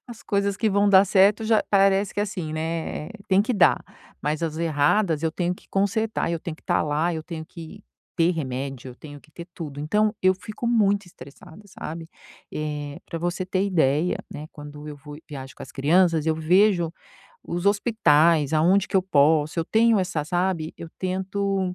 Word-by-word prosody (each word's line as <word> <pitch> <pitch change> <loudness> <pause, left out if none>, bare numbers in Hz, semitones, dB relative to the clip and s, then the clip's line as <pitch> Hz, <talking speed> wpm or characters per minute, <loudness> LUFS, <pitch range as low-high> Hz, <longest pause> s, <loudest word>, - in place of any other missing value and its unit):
as 240 -3 -11
coisas 200 -1 0
que 220 +1 +1
vão 200 0 +2
dar 195 -1 +7
certo 200 +3 +4
já 220 -1 +3
parece 195 0 +3
que - - -2
assim, 185 -6 -3
né, 160 -1 -3 0.2
tem 190 0 +4
que 235 +4 0
dar, 200 - +4 0.4
mas 150 +2 -2
as 160 -1 -2
erradas 165 +2 +1
eu 160 -1 0
tenho 175 +1 -1
que - - -21
consertar, 205 +1 0
eu 170 - -1
tenho 165 0 -6
que - - -23
estar - - +1
lá, 155 +3 0
eu 160 - -4
tenho 160 -1 -7
que 165 -3 -11 0.3
ter 170 -1 +3
remédio, 135 -4 -5
eu - - -12
tenho 145 +2 -11
que 155 - -23
ter 170 +2 -10
tudo, 145 -4 -7
então 210 +8 +1
eu 185 0 +4
fico 215 +5 -7
muito 205 -4 +2
estressada, 160 +4 -14
sabe. 165 -3 -8 0.4
Eh, 150 -1 -4
pra 165 - -5
você 175 +2 -2
ter 190 +1 0
ideia, 165 -3 +1
né, 150 - -7
quando 150 0 -10
eu 150 - -7
vou 145 +1 -11
e 155 - -16
viajo 135 -3 -8
com - - -11
as - - -11
crianças, 160 +3 +2
eu 160 - +2
vejo 175 +1 +3 0.5
os 175 +1 -4
hospitais 170 - +3
aonde 175 +5 +3
que 195 - 0
eu 190 - +3
posso 155 -2 +2
eu 165 - +1
tenho 225 +3 +3
essa, 180 -5 -1
sabe, 175 -1 -1
eu 165 - -9
tento, 190 0 -2
170 Hz, 195 wpm, -24 LUFS, 155-195 Hz, 0.5 s, dar